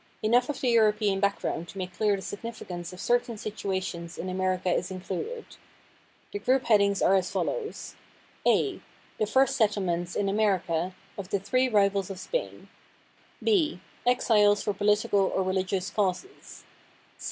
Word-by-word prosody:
Enough 240 Hz, +4 st, +3 dB
of 295 Hz, -, -4 dB
the 255 Hz, -, +2 dB
European 210 Hz, -3 st, +3 dB
background 200 Hz, -4 st, -1 dB
to 195 Hz, -, -11 dB
make 185 Hz, -1 st, -4 dB
clear 210 Hz, -2 st, +2 dB
the 190 Hz, -, -7 dB
significance 200 Hz, -5 st, -6 dB
of 180 Hz, -, -11 dB
certain 240 Hz, 0 st, 0 dB
situations 190 Hz, -5 st, -4 dB
in 185 Hz, -, -4 dB
America 185 Hz, 0 st, -1 dB
is 180 Hz, -, -1 dB
included. 190 Hz, -, -5 dB, 0.9 s
The 410 Hz, -, -4 dB
group 260 Hz, -6 st, +2 dB
headings 200 Hz, -3 st, +3 dB
are -, -, +5 dB
as 190 Hz, -2 st, +2 dB
follows: 470 Hz, -3 st, -3 dB, 0.5 s
A -, -, +2 dB, 0.4 s
"The 215 Hz, -, +1 dB
First 265 Hz, +5 st, +3 dB
Settlements 185 Hz, -7 st, 0 dB
(in 200 Hz, -, 0 dB
America) 185 Hz, -4 st, 0 dB, 0.2 s
of 190 Hz, -2 st, -6 dB
the 200 Hz, -, +1 dB
Three 255 Hz, +7 st, +1 dB
Rivals 200 Hz, -3 st, +2 dB
of 195 Hz, -, -6 dB
Spain." -, -, -4 dB, 0.8 s
B 345 Hz, -8 st, +2 dB, 0.2 s
"Exiles 210 Hz, -4 st, +3 dB
for 205 Hz, -, 0 dB
Political 205 Hz, 0 st, +2 dB, 0.2 s
or 190 Hz, -, +2 dB
Religious 185 Hz, +1 st, -1 dB
Causes." 205 Hz, -, -3 dB
200 Hz, 145 wpm, -27 LUFS, 185-230 Hz, 0.9 s, are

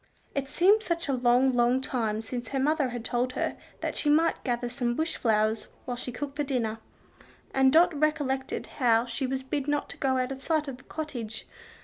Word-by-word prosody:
It 275 Hz, -1 st, -2 dB
seemed 385 Hz, +9 st, +4 dB
such 340 Hz, -6 st, -2 dB
a 275 Hz, -, +1 dB
long, 250 Hz, +1 st, +3 dB
long 245 Hz, +1 st, +3 dB
time 225 Hz, -5 st, -1 dB
since 240 Hz, 0 st, -5 dB
her 270 Hz, -, -2 dB
mother 290 Hz, 0 st, +2 dB
had 240 Hz, -2 st, -6 dB
told 250 Hz, +2 st, 0 dB
her -, -, -1 dB, 0.3 s
that -, -, -2 dB
she 295 Hz, -, 0 dB
might 320 Hz, +3 st, +3 dB
gather 245 Hz, -1 st, -1 dB
some 240 Hz, -1 st, -1 dB
bush 320 Hz, +4 st, -1 dB
flowers 215 Hz, -1 st, +1 dB, 0.2 s
while 245 Hz, -, -3 dB
she 250 Hz, +1 st, -4 dB
cooked 280 Hz, +3 st, -5 dB
the 295 Hz, -, +1 dB
dinner, 235 Hz, -5 st, -1 dB, 0.7 s
and 265 Hz, 0 st, +5 dB
Dot 340 Hz, +3 st, +5 dB
recollected 285 Hz, -3 st, 0 dB
how 235 Hz, -2 st, +4 dB
she 260 Hz, +2 st, -2 dB
was 265 Hz, 0 st, -2 dB
bid 275 Hz, +1 st, -2 dB
not 290 Hz, 0 st, 0 dB
to -, -, -8 dB
go 265 Hz, -1 st, +1 dB
out 255 Hz, +1 st, 0 dB
of 270 Hz, 0 st, -6 dB
sight 310 Hz, 0 st, 0 dB
of 265 Hz, -2 st, -5 dB
the 265 Hz, -, -19 dB
cottage. 245 Hz, -9 st, -5 dB
265 Hz, 210 wpm, -28 LUFS, 240-290 Hz, 0.7 s, and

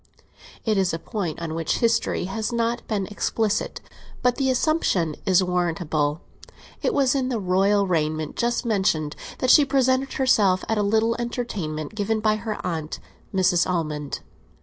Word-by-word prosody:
It 215 Hz, -3 st, +2 dB
is 185 Hz, -3 st, +1 dB
a -, -, -3 dB
point 170 Hz, -2 st, -4 dB
on 165 Hz, -2 st, -4 dB
which 165 Hz, -1 st, -1 dB
history 230 Hz, -4 st, +1 dB
has 215 Hz, +5 st, -3 dB
not 235 Hz, 0 st, -1 dB
been 205 Hz, -3 st, -1 dB
explicit, 210 Hz, +1 st, -1 dB, 0.4 s
but 250 Hz, -1 st, +2 dB
the 270 Hz, -1 st, +1 dB
assumption 250 Hz, -, +1 dB
is 185 Hz, 0 st, +5 dB
warrantable; 165 Hz, -4 st, 0 dB, 0.6 s
it -, -, +1 dB
was 270 Hz, -3 st, +2 dB
in 265 Hz, -2 st, 0 dB
the 240 Hz, -3 st, -1 dB
royal 195 Hz, +2 st, +2 dB
raiment 155 Hz, -3 st, -1 dB
just 240 Hz, +1 st, 0 dB
mentioned 190 Hz, -9 st, +1 dB, 0.2 s
that 255 Hz, -, +3 dB
she 295 Hz, -, +8 dB
presented 265 Hz, -1 st, +1 dB
herself 205 Hz, -8 st, +3 dB
at 220 Hz, -1 st, 0 dB
a -, -, +3 dB
little 220 Hz, +3 st, +2 dB
entertainment 205 Hz, -, -4 dB
given 215 Hz, +1 st, -1 dB
by 215 Hz, 0 st, +2 dB
her 215 Hz, 0 st, -4 dB
aunt, 160 Hz, -3 st, -3 dB, 0.3 s
Mrs. 185 Hz, -2 st, +2 dB
Almond. 150 Hz, -5 st, -2 dB
200 Hz, 155 wpm, -24 LUFS, 170-235 Hz, 0.6 s, she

